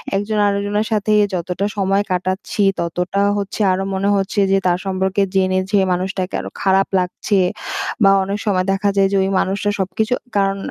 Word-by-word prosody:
একজন 205 +2 -1
আরেকজনের 205 +1 0
সাথে 215 0 0 0.2
যতটা 180 +2 -2
সময় 195 0 +2
কাটাচ্ছি, 185 +3 -2 0.2
ততটা 180 +3 -1 0.2
হচ্ছে 200 +1 -4
আরো 185 +1 0
মনে 195 +1 0
হচ্ছে 200 +1 0
যে 195 - +4
তার 175 0 +2
সম্পর্কে 190 0 -1 0.2
জেনে 185 0 +2
যে 205 - +4
মানুষটাকে 185 +1 -3
আরো - - -7
খারাপ 195 0 +3
লাগছে। 180 +3 -1 0.7
বা 195 - +7
অনেক 200 +2 -3
সময় 185 -3 +1
দেখা 200 +1 0
যায় 195 0 +5
যে - - 0
ওই 190 - 0
মানুষটা 200 +2 -1
সবকিছু 220 +5 -1 0.2
কারণ 195 0 +1
195 Hz, 170 wpm, -19 LUFS, 185-200 Hz, 0.7 s, বা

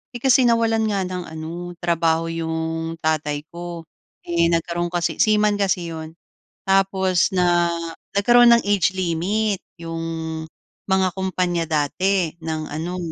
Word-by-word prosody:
eh, - - -4
kasi 260 -1 +5
nawalan 225 -1 +2
nga 200 -2 0
ng 180 -1 -4
ano, 165 +2 -7
trabaho 165 -1 +1
yung 165 0 -3
tatay 150 -2 0
ko. 170 -1 -7 0.4
Eh, 170 -1 +2
nagkaroon 170 +1 0
kasi 175 -1 -1
seaman 210 -1 +3
kasi 180 -4 0
‘yon, 160 0 -8 0.5
tapos 190 -2 +2
na 175 -1 +3 0.4
nagkaroon 240 +4 +6
ng 235 - +3
age 200 -2 +2
limit 190 +4 0 0.2
yung 165 -1 -5 0.9
mga 190 0 +3
kumpanya 180 -3 -1
dati 165 +4 +1
ng 160 -1 -3
ano, 170 +4 -4
175 Hz, 130 wpm, -22 LUFS, 165-195 Hz, 0.9 s, nagkaroon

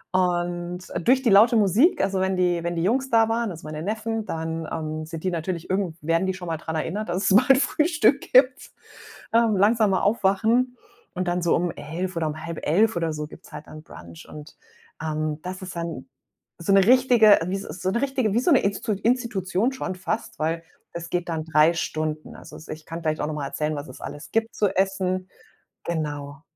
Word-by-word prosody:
Und 175 -1 0 0.3
durch 260 +1 +4
die 240 - +3
laute 225 +5 +6
Musik 230 - +4
also, 195 0 0
wenn 190 0 0
die 175 -2 +1
wenn 170 0 -2
die 165 - -1
Jungs 260 +7 +1
da 225 -1 +4
waren, 230 -1 0
also, 160 -2 -9
meine 155 0 -6
Neffen, 220 +2 -3
dann, 160 0 -4
ähm, 155 0 -4
sind 160 0 -8
die 185 - +1
natürlich 170 0 -4
irgend 185 -4 -1
werden 165 +4 +1
die 190 - -1
schon 180 -2 -8
mal 165 - -2
dran 160 0 -5
erinnert, 195 +6 -3
dass 185 +4 0
es 190 - +5
bald 260 +3 +6
Frühstück 300 -2 +2
gibt. 255 0 +4 0.6
Ähm, 230 -3 +3
langsam 215 +2 +3
mal 185 - +1
aufwachen 225 +5 +1 0.4
und 180 0 -2
dann 175 0 0
so 170 - +2
um 175 0 0
11:00 170 +6 -5
oder 165 -2 -1
um 155 +2 -6
10:30 170 +6 +1
oder 165 -2 -1
so 150 0 -4
gibt's - - -15
halt 150 - -8
dann 155 - -10
Brunch. 85 - -13
Und, 150 0 -11 0.5
ähm, 155 -1 -2
das 185 +1 -6
ist 185 -1 -8
dann 165 -6 -5 0.5
so 170 +4 +1
'ne 195 -1 +6
richtige 245 -3 +6
wie 190 - -1
s 195 - -4
s 170 +1 -9
so 185 - 0
'ne 235 - 0
richtige 270 -7 0
wie 235 - +3
so 255 - +2
'ne 275 - +6
Instu 200 +3 -1
Institution 215 -1 0
schon 200 -7 -4
fast, 220 +4 -4
weil 165 +2 -1 0.3
das 170 0 -6
geht 175 0 -2
dann 160 -2 -2
3 155 +1 +4
Stunden. 155 -2 -3
Also, - - -12
ich 155 0 -8
kann 165 +1 -7
vielleicht 155 -1 -1
auch - - 0
noch 155 - -3
mal 145 -2 -3
erzählen, 150 +1 -2
was 145 +1 -6
es 130 - -11
alles 145 - -8
gibt 225 0 0
zu 210 - +2
essen. 185 -1 0 0.6
Genau. 150 -2 -4
180 Hz, 210 wpm, -24 LUFS, 160-220 Hz, 0.6 s, laute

